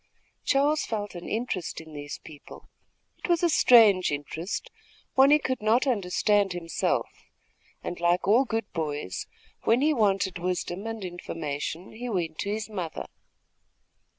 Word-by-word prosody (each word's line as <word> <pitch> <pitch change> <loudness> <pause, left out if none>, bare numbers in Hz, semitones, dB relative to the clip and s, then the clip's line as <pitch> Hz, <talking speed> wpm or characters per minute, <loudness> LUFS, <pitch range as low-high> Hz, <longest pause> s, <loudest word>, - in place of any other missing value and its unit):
Charles 290 +3 +3
felt 205 -2 -3
an 175 -1 -7
interest 220 -6 -2
in 160 -1 -12
these 145 -1 -6
people. 150 -3 -12 0.6
It - - -4
was 345 0 +2
a 345 - +4
strange 215 - +6
interest, 150 +5 -4 0.4
one 265 +1 +6
he 300 - +7
could 260 -5 -2
not 225 +5 +3
understand 200 - +2
himself, 170 -1 -1 0.8
and 175 - -5
like 175 +2 +2
all 230 +6 +6
good 225 -3 -2
boys, 150 - -3 0.3
when 230 +3 +3
he 305 +2 +4
wanted 195 -6 +1
wisdom 180 +3 -3
and 225 -3 -4
information, 165 -1 -5
he 245 +3 -6
went 170 -7 -2
to 200 - -2
his 215 +1 -2
mother. 185 -7 -5
195 Hz, 145 wpm, -27 LUFS, 170-230 Hz, 0.8 s, he